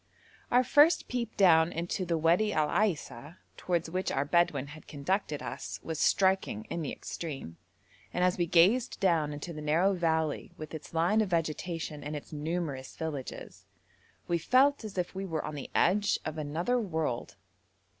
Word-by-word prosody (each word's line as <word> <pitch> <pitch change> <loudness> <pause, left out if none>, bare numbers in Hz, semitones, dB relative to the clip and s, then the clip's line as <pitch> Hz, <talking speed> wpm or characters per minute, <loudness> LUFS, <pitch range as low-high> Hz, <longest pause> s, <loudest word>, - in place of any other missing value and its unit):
Our 250 +1 +4
first 295 +6 +5
peep 235 -2 -3
down 170 -4 +5
into 175 +2 -3
the 165 -1 +1
Wadi 170 +7 +3
Al 155 -1 +1
Aisa, 160 - -1 0.2
towards 170 -2 -1
which 185 +3 -2
our 135 +1 0
Bedouin 145 -4 +1
had 155 - -13
conducted 150 0 -2
us, - - -6
was 160 -2 -4
striking 190 - +2
in 170 - -2
the 150 - -3
extreme, 135 - -6 0.5
and 180 - 0
as 180 0 +3
we 175 -1 0
gazed 195 +10 +3
down 165 -6 +2
into 150 +4 -6
the 150 - -7
narrow 165 +6 +2
valley, 160 -4 -1
with 155 0 -8
its 155 +1 -8
line 175 +7 +3
of 210 - -1
vegetation 165 -2 -2
and 150 +1 -4
its 150 - -8
numerous 150 -3 -3
villages, 150 -5 -6 0.6
we 170 -1 +1
felt 265 - +3
as 210 -3 -8
if 180 -1 -2
we 190 +1 -4
were 160 -3 -3
on 155 - -5
the 145 -2 -6
edge 205 +3 +3
of 155 - -3
another 165 +12 0
world. 160 - -2
165 Hz, 170 wpm, -30 LUFS, 150-190 Hz, 0.6 s, first